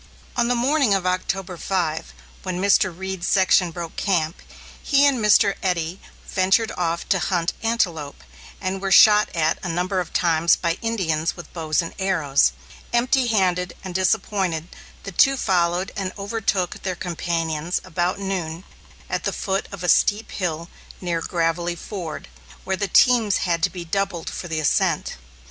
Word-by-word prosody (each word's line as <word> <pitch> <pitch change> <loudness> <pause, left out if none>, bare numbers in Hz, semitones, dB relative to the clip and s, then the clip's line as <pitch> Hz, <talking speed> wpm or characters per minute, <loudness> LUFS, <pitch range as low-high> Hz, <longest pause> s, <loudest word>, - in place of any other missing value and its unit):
On 240 -1 +2
the 245 - +1
morning 255 -2 +2
of 190 -2 -2
October 185 0 -2
5, 165 -4 -2 0.3
when 185 -1 -4
Mr. 190 -1 +3
Reed's 190 +1 -5
section 185 -2 +4
broke 170 0 -7
camp, 170 -4 0 0.4
he 280 -1 +3
and 275 -3 +3
Mr. 210 -1 +5
Eddy 180 -1 -2 0.3
ventured 195 +4 +2
off 170 -1 -2
to 190 - +3
hunt 175 0 0
antelope, 175 -11 -1 0.4
and 190 0 -3
were 195 -1 -2
shot 210 +2 +7
at 160 -1 +1
a 180 - -3
number 180 +3 -1
of 180 - -4
times 170 -1 +3
by 170 0 -2
Indians 170 -9 -1
with 175 -3 -11
bows 160 -1 0
and 165 - -7
arrows. 165 -8 +2 0.4
Empty 245 +2 +2
handed 180 -5 +1
and 185 -2 -6
disappointed, 185 -3 0 0.3
the 200 - -6
two 275 +9 +4
followed 180 -3 +1
and 195 -3 -3
overtook 200 -3 -2
their 185 -2 -3
companions 165 -2 -2
about 180 0 -1
noon, 185 -4 -4 0.4
at - - -3
the - - 0
foot 195 -1 -2
of 200 -3 -8
a - - -1
steep 210 +4 +3
hill 170 -3 -3 0.3
near 170 -2 -2
"Gravelly 170 +1 -1
Ford," 175 -3 -7 0.4
where 190 - -1
the 200 +1 -2
teams 230 -3 +4
had 170 -2 0
to - - +3
be 180 -2 -7
doubled 190 -1 -2
for 175 - -6
the 160 -2 -2
ascent. 155 - 0
185 Hz, 160 wpm, -22 LUFS, 170-200 Hz, 0.4 s, shot